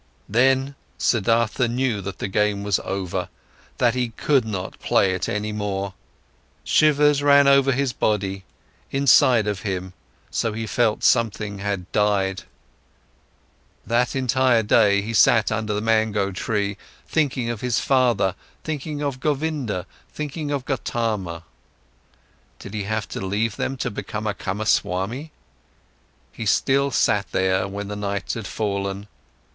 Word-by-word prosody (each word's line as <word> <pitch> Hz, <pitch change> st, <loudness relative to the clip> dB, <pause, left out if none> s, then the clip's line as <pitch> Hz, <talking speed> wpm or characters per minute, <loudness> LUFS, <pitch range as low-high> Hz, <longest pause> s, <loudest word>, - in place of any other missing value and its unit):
Then, 130 Hz, +4 st, +2 dB, 0.2 s
Siddhartha 115 Hz, +2 st, +2 dB
knew 120 Hz, -3 st, -1 dB
that 95 Hz, -1 st, -6 dB
the -, -, -3 dB
game 105 Hz, +1 st, 0 dB
was 100 Hz, -2 st, +1 dB
over, 95 Hz, -2 st, -3 dB, 0.5 s
that 120 Hz, -2 st, +3 dB
he 125 Hz, -1 st, -1 dB
could 130 Hz, +2 st, +1 dB
not 95 Hz, -4 st, -5 dB
play 95 Hz, -1 st, +2 dB
it 95 Hz, -, -2 dB
any 105 Hz, +1 st, -2 dB
more. 100 Hz, -2 st, -3 dB, 0.7 s
Shivers 150 Hz, -1 st, +4 dB
ran 140 Hz, 0 st, +6 dB
over 140 Hz, 0 st, +5 dB
his 135 Hz, -1 st, 0 dB
body, 95 Hz, -4 st, -1 dB, 0.5 s
inside 135 Hz, -4 st, +4 dB
of 105 Hz, -2 st, -2 dB
him, 95 Hz, -2 st, -4 dB, 0.4 s
so 115 Hz, -2 st, -1 dB
he 110 Hz, +1 st, -4 dB
felt, 110 Hz, +1 st, 0 dB
something 110 Hz, -4 st, +1 dB
had 100 Hz, -3 st, -3 dB
died. 100 Hz, -2 st, +1 dB, 1.4 s
That 120 Hz, +3 st, +1 dB
entire 130 Hz, -2 st, +2 dB
day, 105 Hz, -2 st, +4 dB
he 115 Hz, +2 st, -4 dB
sat 110 Hz, +1 st, +4 dB
under 110 Hz, -1 st, -1 dB
the 105 Hz, 0 st, -1 dB
mango 110 Hz, -3 st, +1 dB
tree, 100 Hz, +1 st, -2 dB, 0.3 s
thinking 130 Hz, -6 st, 0 dB
of 115 Hz, -, -6 dB
his 125 Hz, -3 st, 0 dB
father, 120 Hz, -8 st, +2 dB, 0.3 s
thinking 150 Hz, -1 st, -4 dB
of 140 Hz, -3 st, -2 dB
Govinda, 145 Hz, -, -2 dB, 0.3 s
thinking 150 Hz, 0 st, -5 dB
of 140 Hz, -3 st, -2 dB
Gotama. 110 Hz, -, -2 dB, 1.1 s
Did 100 Hz, -, -10 dB
he 105 Hz, -2 st, -3 dB
have 110 Hz, 0 st, -2 dB
to -, -, -5 dB
leave 105 Hz, +3 st, -1 dB
them 135 Hz, -, -3 dB
to -, -, -2 dB
become 105 Hz, +1 st, -5 dB
a 105 Hz, -, 0 dB
Kamaswami? 105 Hz, -, -1 dB, 1.0 s
He 110 Hz, -, -6 dB
still 140 Hz, +7 st, +2 dB
sat 105 Hz, -7 st, +1 dB
there, 95 Hz, 0 st, +1 dB
when 100 Hz, +1 st, -5 dB
the 105 Hz, -, -5 dB
night 100 Hz, -1 st, -3 dB
had 110 Hz, -4 st, -5 dB
fallen. 100 Hz, -1 st, -3 dB
110 Hz, 140 wpm, -23 LUFS, 100-130 Hz, 1.4 s, ran